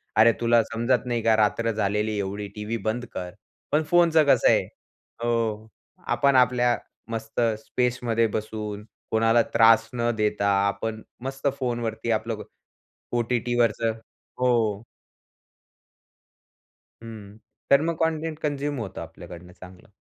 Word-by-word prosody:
"अरे 115 +1 +7
तुला 120 0 +4
समजत 120 +4 0
नाही 120 -2 -1
का? 110 -1 +4
रात्र 110 +2 +1
झालेली 105 0 -1
एवढी 100 +1 -3
टीव्ही 105 +2 -3
बंद 120 +3 -1
कर." 90 -1 -5 0.4
पण 150 +2 +2
फोनचं 170 -3 +5
कसं - - +5
आहे - - +4 0.6
हो, 110 -2 -1 0.4
आपण 140 -1 +2
आपल्या 125 -1 +3 0.3
मस्त 115 +1 -3 0.2
स्पेसमध्ये 120 -2 0
बसून 105 -1 -4 0.3
कोणाला 115 +1 +4
त्रास 115 0 +5
न 120 -1 0
देता 105 -1 0 0.2
आपण 110 +2 -3 0.2
मस्त 135 +1 -3
फोनवरती 120 -2 -2
आपलं 110 +1 -1
को 105 - -8 0.8
ओ-टी-टीवरचं 120 -1 +1 0.5
हो. 115 -5 +1 2.2
हं. 110 -2 -10 0.3
तर 140 +1 +6
मग 165 0 -1
कंटेंट 160 -1 -2
कन्झ्युम 145 -1 -2
होतं 95 -6 -6
आपल्याकडनं 85 +1 -11
चांगलं. 95 +1 -13
115 Hz, 120 wpm, -25 LUFS, 105-125 Hz, 2.2 s, अरे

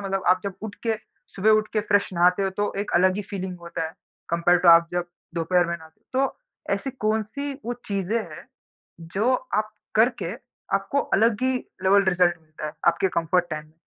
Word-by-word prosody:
मतलब 195 0 -1
आप 185 +1 +5
जब 200 -2 -3
उठ 215 -2 -5
के 225 - +3 0.4
सुबह 205 +3 +3
उठ 215 0 -3
के 215 - +2
फ्रेश 205 0 +4
नहाते 180 +3 +4
हो, 195 - 0
तो 205 +2 -2
एक 205 - -4
अलग 185 +2 +4
ही 210 - -2
फीलिंग 185 -2 -4
होता 170 -1 -4
है, 160 - -9 0.4
कंपेयर 170 +1 +4
टू 175 - +3
आप 170 0 +8
जब 175 0 -1 0.3
दोपहर 175 +1 +2
में 170 0 -2
नहाते। 160 -1 -17
तो 270 +1 +1 0.4
ऐसी 270 - -4 0.2
कौन-सी 220 +7 -1
वो 240 - -1 0.2
चीज़ें 200 +2 0 0.2
हैं, - - -12 0.6
जो 200 +10 0 0.2
आप 215 +1 0 0.2
करके 235 +3 +2 0.4
आपको 280 - 0 0.2
अलग 225 +2 +2
ही 260 0 +2 0.3
लेवल 200 +1 +5
रिजल्ट 180 -2 +3
मिलता 155 -1 -9
है, 150 - -5
आपके 170 +3 +3
कम्फर्ट 175 +1 +1
टाइम? 155 -1 -6
190 Hz, 190 wpm, -24 LUFS, 170-215 Hz, 0.6 s, आप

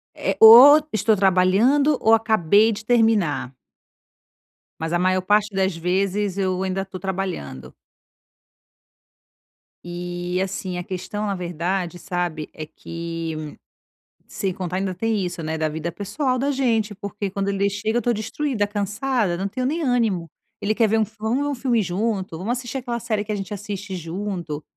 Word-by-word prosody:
Eh, - - -1
ou 255 +7 +10
estou 215 +1 +2
trabalhando 200 +10 +3
ou 225 - +4
acabei 220 -1 +4
de 210 +1 -6
terminar. 220 - +2 1.3
Mas 160 +1 -3
a 175 - +2
maior 185 +1 +2
parte 205 +2 +2
das 190 -2 +1
vezes 190 +3 -1
eu 185 -1 0
ainda 190 0 -2
tô 190 -1 -9
trabalhando. 175 - -5 2.1
E, 175 +1 -4
assim, 185 -1 -4
a 180 - -4
questão, 190 +3 -5
na 200 - -1
verdade, 175 0 -3
sabe, 175 -5 -3
é 155 - -7
que 165 -2 -6 0.7
sem 195 -2 -3
contar 180 -1 -4
ainda 190 0 -2
tem 225 +4 -1
isso, 175 -1 -5
né, 160 0 -3
da 155 -1 -1
vida 160 +2 -4
pessoal 255 - -2
da 275 +3 0
gente, 230 -6 0
porque 200 0 -5
quando 195 +1 -2
ele 200 0 +1
chega, 215 +3 -2
eu 240 - +1
tô 240 - +1
destruída, 220 +1 -2
cansada, 205 -1 -1
não 195 +2 -2
tenho 255 +5 -3
nem 315 +5 -1
ânimo. 225 - 0 0.3
Ele 210 +2 0
quer 225 0 +3
ver 220 +1 +1
um 220 - +3
fil 220 +1 -17
"vamos 225 +5 0
ver - - -1
um 290 - -1
filme 245 -3 +1
junto, 195 -2 -2
vamos 190 +8 -2
assistir 245 +1 -6
aquela 240 -2 -4
série 215 -3 -2
que 215 - -4
a - - -1
gente 200 +1 -5
assiste 200 -1 -6
junto". 170 -3 -5
195 Hz, 165 wpm, -22 LUFS, 180-220 Hz, 2.1 s, ou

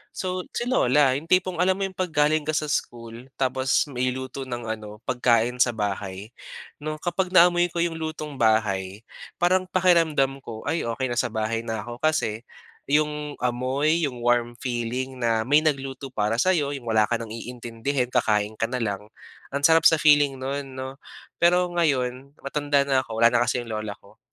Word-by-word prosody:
So, 185 -1 -3
si - - -1
lola 145 - +3
'yong 140 +5 -3
tipong 185 -1 +1
alam 185 +1 +3
mo 195 - -3
'yong 195 -1 -3
'pag 185 - 0
galing 150 0 +1
ka 155 - 0
sa 150 -1 -1
school 115 0 -4
tapos 130 0 +1
may 125 0 -1
luto 130 +1 -6
ng 120 -1 -5 0.2
ano 105 +1 -11
pagkain 125 -1 +1
sa 120 -2 +3
bahay, 100 0 -4 0.5
no'ng 155 +1 -4
kapag 180 +1 -1
naamoy 175 0 +6
ko 170 0 -1
'yong 165 -1 -2
lutong 155 -3 -5
bahay, 105 -3 +1 0.3
parang 185 +1 +2
pakiramdam 165 -7 +2
ko 115 -5 -9
"Ay, 165 -6 -1
okey 120 +2 -2
na 120 - 0
sa - - +1
bahay 110 0 -2
na 110 -2 -3
ako" 120 0 -8
kasi 125 -7 -1 0.4
'yong 150 0 0
amoy, 130 +7 0
'yong 130 -5 -2
warm 120 0 +1
feeling 125 +1 -3
na 115 -2 0
may 145 +3 +4
nagluto 135 -3 -2
para 105 -2 0
sa 185 +11 +3
'yo 145 -6 0
'yong 135 - -8
wala 110 -1 +3
ka 120 - 0
nang 115 -2 -6
iintindihin 120 +2 -3
kakain 110 -3 +1
ka 115 - +1
na 125 - -4
lang, 105 -1 -3 0.5
ang 140 - -2
sarap 165 +1 +6
sa 160 - +5
feeling 145 -3 +4
no'n 135 +2 -4
'no. 130 +1 -7 0.4
Pero 180 +1 +3
ngayon 140 -5 -1
matanda 145 0 +1
na 135 -1 +2
ako 130 - -6
wala 115 - +7
na 120 - +3
kasi 120 +1 0
'yong 115 - -9
lola 110 -1 -4
ko. - - -20
130 Hz, 185 wpm, -24 LUFS, 115-155 Hz, 0.5 s, wala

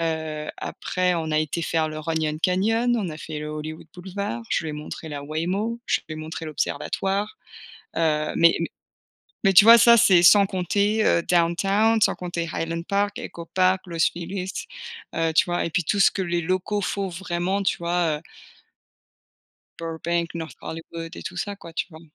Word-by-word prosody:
heu, 160 -2 -3
après 180 -1 -1
on 160 -2 -2
a 155 - +2
été 155 +2 -1
faire 160 -1 0
le 155 - -6
Runyon 155 -1 -2
Canyon, 225 +6 +2
on 190 -5 -2
a 155 - -8
fait 155 -1 -6
le 150 - -5
Hollywood 155 +1 -6
Boulevard, 180 - -5
je - - +1
lui 155 - -3
ai - - -6
montré 150 +2 -7
la 145 -1 -5
Waymo, 180 +10 -2
je - - +1
lui 155 - -5
ai - - -8
montré 160 +1 -6
l'observatoire. 195 - -2 0.6
Heu, 155 -2 +1
mais 170 0 +6
mais 165 - -1 0.8
mais 195 - +5
tu 200 - +9
vois, 230 +1 +10
ça, 235 +1 +7
c'est 185 -5 +6
sans 200 +2 +8
compter, 200 +4 0
heu, 170 - +4
downtown, 195 +6 +2
sans - - +4
compter 175 -2 -4
Highland 165 0 -3
Park, 200 +2 0
Ecopark, 185 +2 0
Los 165 -1 -6
Feliz, 185 +2 -5 0.6
heu, 165 -1 +1
tu - - +4
vois, 175 0 -1
et - - -2
puis 180 -1 +1
tout 200 +5 0
ce - - +6
que 195 - -3
les 175 -1 -1
locaux 185 +4 -1
font 195 +1 -2
vraiment, 180 +2 -2
tu - - +1
vois, 170 -2 0
heu - - -14 1.6
Burbank, 170 +1 -2
North 160 -1 -6
Hollywood 165 +1 -7
et - - -8
tout - - -7
ça, 205 - -3
quoi, 170 -4 -12
tu - - -2
vois? 160 - -12
170 Hz, 185 wpm, -24 LUFS, 160-195 Hz, 1.6 s, vois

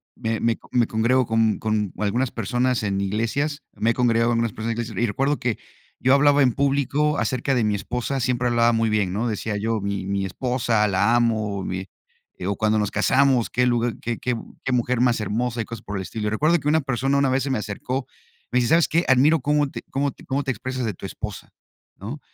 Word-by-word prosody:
me 115 -2 -2
me 115 0 +1
me 120 -2 +2
congrego 120 +4 +2
con 115 -1 +1
con 105 -3 -1
algunas 120 +5 0
personas 125 -2 0
en 100 -1 -1
iglesias, 125 +9 -1
me 115 - 0
he - - +3
congregado 115 -1 +2
con 120 - +1
algunas 115 -3 0
personas 115 +1 -3
en - - -9
iglesias 115 -4 -4
y - - +5
recuerdo 135 +7 0
que, 120 -3 -1 0.4
yo 130 - +3
hablaba 145 +1 +5
en 125 -3 +3
público 140 +2 +1
acerca 130 +1 0
de 120 - +2
mi 105 -1 +1
esposa. 125 +6 -3
Siempre 125 -1 0
hablaba 120 0 +3
muy 115 -1 +1
bien, 105 -4 +1
¿no?, 110 +5 -1
decía 105 -1 -2
yo 110 +1 -1
mi 100 -1 -3
mi 100 0 -1
esposa, 115 +1 0
la 100 +4 +2
amo 110 -4 0
mi 95 0 -4 0.6
o 100 +1 0
cuando 110 +2 +1
nos 105 -1 -1
casamos. 130 +3 +3
Qué 125 - +1
lugar 120 -1 +1
Qué 120 -1 -3
qué, 125 -1 -1 0.3
qué 130 - -1
mujer 125 0 +1
más 125 -2 +3
hermosa 115 +3 -1
y - - -4
cosas 115 -2 -8
por 100 -1 -5
el 95 - -3
estilo. 105 +4 -3
Recuerdo 155 +10 +2
que 145 - -5
una 160 +2 +3
persona 135 0 0
una 140 -1 +3
vez 130 +1 +1
se 140 - -3
me 130 - +1
acercó, 125 +5 -4 0.5
me - - +1
dice, 120 - +1
sabes, 165 0 +4
¿qué?, 170 +2 +1
admiro 140 +5 +5
cómo 145 +1 +1
te - - -7
cómo 140 0 0
te - - -17
cómo 140 +1 -1
te 135 - -1
expresas 130 -1 -4
de 110 - -2
tu - - -10
esposa, - - -7 0.5
¿no? 115 +10 -7
120 Hz, 225 wpm, -23 LUFS, 110-130 Hz, 0.6 s, y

